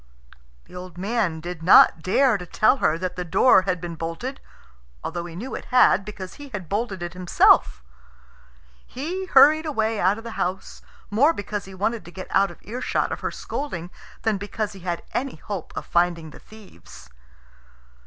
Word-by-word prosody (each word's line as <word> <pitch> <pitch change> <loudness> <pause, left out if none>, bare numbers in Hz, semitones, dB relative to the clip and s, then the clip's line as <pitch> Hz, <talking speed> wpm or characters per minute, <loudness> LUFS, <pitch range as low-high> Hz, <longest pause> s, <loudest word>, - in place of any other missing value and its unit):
The - - -16
old 180 -1 -9
man 195 -4 -1
did 175 0 -7
not 165 -1 +7
dare 235 - +3
to 180 -3 -6
tell 215 +9 +3
her 155 -10 +1
that 180 +1 -4
the 180 - -3
door 185 +5 +5
had 180 -1 0
been 170 0 -6
bolted, 165 - -5 0.6
although 170 +1 -4
he 170 -1 -9
knew 240 +9 -6
it - - -6
had, 245 -6 +4
because 195 -3 -8
he 290 -1 -11
had 200 -8 -6
bolted 200 -1 -3
it 175 0 -5
himself. 75 - +3 1.0
He 345 +9 -4
hurried 310 +2 +6
away 220 -6 -1
out 190 +3 +2
of 225 - -9
the 230 - -7
house, 185 +2 -4 0.3
more 280 +10 +4
because 205 -2 -5
he 190 0 -11
wanted 220 +4 -2
to 175 - -11
get 185 +2 -9
out 195 0 +3
of 175 - -12
earshot 245 +4 -2
of - - -4
her - - -2
scolding 180 - -5 0.3
than 220 -3 0
because 210 +1 -4
he 195 - -11
had 175 -1 -4
any 270 0 -2
hope 185 +2 -7
of - - -5
finding 170 -2 0
the - - -13
thieves. 200 - -15
190 Hz, 185 wpm, -23 LUFS, 175-230 Hz, 1.0 s, not